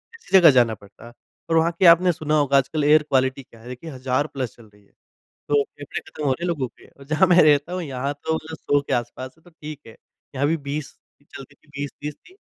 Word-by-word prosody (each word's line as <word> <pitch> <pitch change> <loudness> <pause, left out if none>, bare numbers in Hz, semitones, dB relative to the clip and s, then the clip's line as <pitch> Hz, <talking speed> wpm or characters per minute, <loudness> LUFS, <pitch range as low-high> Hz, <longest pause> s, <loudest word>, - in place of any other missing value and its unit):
ऐसी 195 - +2
जगह 170 -4 +8
जाना 120 -4 +3
पड़ता। 100 +3 -16 0.4
और 165 - +1
वहाँ 165 +1 +3
की 190 - +4
आपने 175 +1 +7
सुना 155 -2 -2
होगा 140 -1 +3
आजकल 145 +3 0
एयर 150 +1 +5
क्वालिटी 130 0 +1
क्या 115 -2 -20
है? 115 - -14
देखिए 125 +6 -8
हज़ार 130 +2 -1
प्लस 130 -5 -5
चल 115 - -17
रही 105 0 -23
है, - - -32 0.6
तो 145 -1 +3
फेफ़ड़े 145 0 -8
खत्म 150 - -8
हो 135 - +2
रहे 170 - -3
हैं - - -1
लोगों 150 -7 -1
के 140 - -17
जहाँ 155 +6 +2
मैं 180 0 +6
रहता 150 +3 +3
हूँ 185 - -3
यहाँ 140 -1 -3
तो 160 0 +1 0.2
100 145 -1 +1
के - - -4
आस-पास 120 +2 -4
है 160 - -27
तो 175 - -18
ठीक 155 -2 -10
है। 110 - -13 0.4
यहाँ 140 +2 +1
भी 165 +2 +1
20 150 0 -5 0.4
चलती 140 +1 -11
थी - - -32
20-30 145 +1 -6
थी। 370 - -22
145 Hz, 235 wpm, -22 LUFS, 130-160 Hz, 0.6 s, जगह